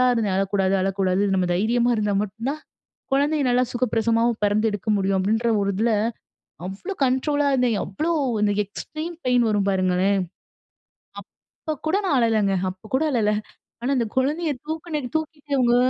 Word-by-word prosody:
இருந்தேன். 215 -5 0
"அழக்கூடாது, 195 0 +1
அழக்கூடாது. 195 0 +1
நம்ம 180 -1 +1
தைரியமா 235 +5 +2
இருந்தா 210 -1 0
மட்டும் 215 +5 -5
தான் 310 - -9 0.5
குழந்தைய 290 +1 +2
நல்லா 250 +1 +3
சுகப்பிரசவமாவும் 230 -1 +1
பிறந்து 210 +2 +2
எடுக்க 205 +1 -5
முடியும்." 195 0 +1
அப்படின்ற 220 +4 +1
ஒரு 200 - 0
இதில 225 +2 +2 0.8
அவ்ளோ 350 - -6
கண்ட்ரோலா 285 +3 +1
இருந்தேன். 250 -5 +2
அவ்ளோ 305 - -2 0.3
அந்த 205 -1 +2
கண்ட்ரோலா 255 - -2
வரும் 205 -1 +1
பாருங்களேன். 185 +1 +2 1.5
அப்ப 310 - 0
கூட 360 - +2
நான் 320 - +2
அழலைங்க. 215 -4 +2
அப்போ 185 +2 -11
கூட 270 - +2
அழல. 220 -5 +2 0.5
ஆனா, 250 - -1
அந்த 235 - +1
குழந்தைய 300 +6 +1 0.2
தூக்கின, 315 0 -3 0.2
தூக்கிட்டு 310 -2 -4
இவங்க 240 -1 +3
230 Hz, 145 wpm, -23 LUFS, 200-280 Hz, 1.5 s, நல்லா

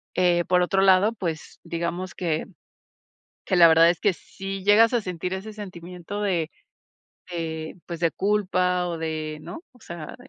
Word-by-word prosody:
eh, 175 -1 +3
por 180 -1 +3
otro 195 +2 +1
lado, 195 +4 +5
pues 165 -7 -5
digamos 170 +2 -4
que 165 -4 -1 1.0
que 185 - 0
la 170 -1 +9
verdad 165 +1 +6
es 175 - -7
que 200 -3 +2
sí 195 +2 -7
llegas 220 +4 +5
a 235 - +2
sentir 180 -1 -4
ese 210 +3 -6
sentimiento 180 0 -7
de 175 -6 0 0.8
de, 160 0 -5
pues, 170 -2 -6
de 165 - +2
culpa, 185 -3 +1
o 170 - -3
de 155 -1 -4
¿no? 330 - -9
O 245 - -21
sea, 170 -3 -8
180 Hz, 165 wpm, -25 LUFS, 165-195 Hz, 1.0 s, la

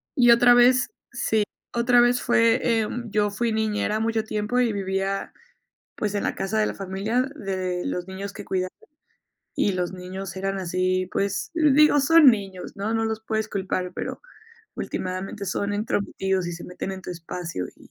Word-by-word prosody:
Y 240 -3 +6
otra 245 +1 +7
vez 250 +1 +6
sí, - - -7 0.9
otra 240 +1 +4
vez 245 +1 +4
fue, 235 0 +3
eh, 225 -3 +2 0.2
yo 210 -1 +1
fui 230 +3 -1
niñera 215 0 0
mucho 225 0 0
tiempo 215 +3 -1
y 235 -3 +2
vivía, 195 0 -2 0.6
pues, 210 -1 -2
en 205 - 0
la - - -1
casa 205 +3 -2
de 210 - +3
la - - -3
familia, 200 +5 -1
de 185 -6 -3
los 180 0 -3
niños 195 +1 -6
que 205 - -8
cuidaba. 185 -1 -1 0.8
Y 200 - +1
los 180 -1 -2
niños 185 +2 -7
eran 195 0 -2
así, 185 +1 0
pues 200 0 -1
digo, 300 -2 +5
son 325 +2 +6
niños, 195 -4 -4
¿no?, 210 +3 -2
no 225 0 +1
los 220 0 -2
puedes 220 -1 -2
culpar, 185 -2 -2
pero - - -5 0.5
ultimadamente 185 +2 -4
son 200 +2 -2
entrometidos 195 -3 -1
y 175 - -3
se 170 - -8
meten 180 +2 -5
en 190 0 -8
tu - - -6
espacio, 170 - -5
y - - -18
205 Hz, 175 wpm, -24 LUFS, 190-230 Hz, 0.9 s, otra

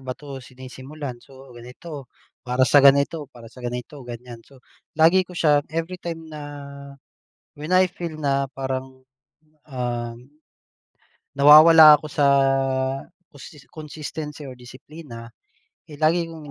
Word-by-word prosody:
ba 130 - -4
'to 140 -2 -10
sinisimulan? 130 +1 -10
So, 135 -1 -16
ganito, 125 +3 -11 0.3
para 125 +1 0
sa 145 - +4
ganito, 140 +2 +3
para 120 -4 -16
sa 125 - -14
ganito, 125 +4 -7
ganiyan. 120 0 -9
So, 135 -2 -20 0.3
lagi 165 +4 +5
ko 180 -1 -12
siya 150 -3 +3
everytime 165 0 -5
na, 155 -1 -10 1.2
when 150 +5 -6
I 185 0 +4
feel 170 -2 -7
na 140 -1 0
parang, 130 -1 -5 0.6
um, 120 -4 -5 1.2
nawawala 155 +1 +8
ako 155 - -8
sa 145 - +2 1.1
costis 145 0 -14
consistency 150 -1 -8
or 130 - -9
disiplina. 125 -1 -12 0.6
Eh, 150 - -11
lagi 165 +2 +2
kong 160 -3 -11
145 Hz, 125 wpm, -22 LUFS, 130-155 Hz, 1.2 s, nawawala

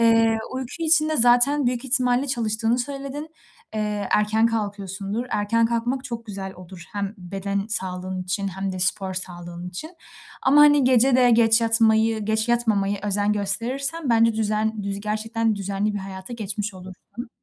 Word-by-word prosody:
Eee, 225 -1 +4
uyku 260 -1 -5
için 315 -1 +3
de 310 - 0
zaten 245 +4 +4
büyük 245 +1 -1
ihtimalle 255 0 +2
çalıştığını 230 -2 0
söyledin. 275 +3 -5 0.5
Eee, 210 -2 -2
erken 215 +2 +3
kalkıyorsundur. 205 0 -3
Erken 225 +3 +1
kalkmak 240 +3 -2
çok 235 -3 -6
güzel 195 -2 -6
olur, 180 -1 -12
hem 200 0 -3
beden 195 +2 -3
sağlığın 185 -3 -3
için 195 +2 -2
hem 195 0 -4
de 185 - -5
spor 190 0 +1
sağlığın 175 -1 -5
için 190 - -8 0.5
ama, 285 +3 +5
hani, 290 -2 +6
gece 255 0 +4
de 250 -1 +5
geç 225 0 +5
yatmayı, 225 -1 +3
geç 220 +2 0
yatmamaya 205 -4 +1
özen 205 0 +1
gösterirsen 255 +9 -2
bence 230 -1 +4
düzen 215 0 -1
düz 200 0 -3
gerçekten 220 +1 -1
düzenli 200 +1 -2
bir - - -2
hayata 190 +3 -8
geçmiş 210 -2 -4
olursun. 190 +6 -10
220 Hz, 155 wpm, -23 LUFS, 195-240 Hz, 0.5 s, hani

